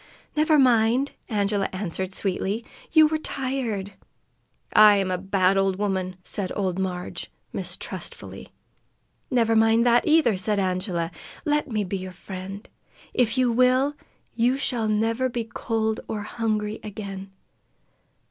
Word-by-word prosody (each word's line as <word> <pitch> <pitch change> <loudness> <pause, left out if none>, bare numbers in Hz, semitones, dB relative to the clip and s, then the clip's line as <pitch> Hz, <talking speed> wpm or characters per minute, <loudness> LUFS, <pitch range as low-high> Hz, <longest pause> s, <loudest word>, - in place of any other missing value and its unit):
"Never 305 0 +4
mind!" 250 +1 +4 0.2
Angela 205 -2 0
answered 185 -1 -3
sweetly. 195 +4 -2 0.3
"You 315 -1 +7
were 310 0 0
tired." 255 -9 -3 0.8
"I 210 -1 +8
am 195 -2 0
a 180 - 0
bad 195 0 +2
old 195 -1 +2
woman!" 190 -2 -2
said 195 0 -1
old 190 -2 -1
Marg, 180 -1 -3 0.3
mistrustfully. - - -6 0.8
"Never 230 -3 +2
mind 225 +1 +4
that, 240 0 +4
either!" 305 -10 +4
said 205 +3 0
Angela. 185 -3 -1 0.3
"Let 295 -1 +1
me 215 -3 0
be 195 +1 -3
your 185 0 -6
friend. 190 +2 -8 0.5
If 245 0 +1
you 255 -2 +3
will, 255 +4 +3 0.4
you 245 +3 +2
shall 240 -5 0
never 225 +4 +1
be 235 -1 -2
cold 220 -1 -2
or 210 -2 -3
hungry 215 -1 -2
again." 195 -2 -7
215 Hz, 130 wpm, -25 LUFS, 195-240 Hz, 0.8 s, I